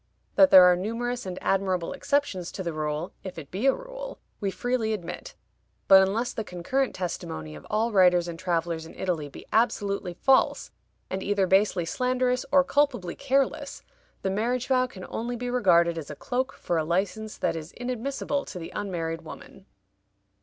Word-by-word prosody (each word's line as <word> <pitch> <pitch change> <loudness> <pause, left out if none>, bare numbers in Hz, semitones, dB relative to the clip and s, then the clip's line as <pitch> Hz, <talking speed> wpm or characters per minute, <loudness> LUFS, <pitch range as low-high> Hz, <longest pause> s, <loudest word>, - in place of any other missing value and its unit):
That 285 - +6
there 185 -1 +10
are 180 0 +7
numerous 230 +4 -3
and 180 -1 -5
admirable 190 -1 0
exceptions 280 -11 -1
to 190 - -4
the 170 -2 -3
rule, 155 +2 -3
if 190 -3 -7
it 150 -4 -9
be 205 +9 0
a 270 - +6
rule, - - -8 0.2
we 200 - -1
freely 235 +1 -1
admit; 180 -6 -6 0.5
but, 195 -1 +9
unless 215 +6 0
the 220 - -3
concurrent 210 +9 -1
testimony 80 - -5
of 75 - -11
all 225 +2 +1
writers 180 -3 +5
and 165 -1 -6
travelers 170 -2 -1
in - - -13
Italy 165 -6 -2
be - - -12
absolutely 200 -5 +1
false, 265 +8 +2 0.4
and 190 0 -2
either 200 -1 +1
basely 190 -2 +3
slanderous 250 +5 0
or 280 -1 +6
culpably 270 -11 +1
careless, 275 0 -1 0.4
the 190 - 0
marriage 240 +5 0
vow 255 -1 +2
can 190 -7 -10
only 240 +2 -3
be 245 +1 -4
regarded 170 -8 +3
as 150 - -8
a 150 - -6
cloak 260 - -2
for 170 -2 -1
a - - 0
license 195 +6 -2
that - - 0
is 160 0 -7
inadmissible 260 +3 -3
to - - -8
the 165 - -7
unmarried 165 -5 -3
woman. 190 +4 -12
195 Hz, 175 wpm, -27 LUFS, 175-250 Hz, 0.5 s, there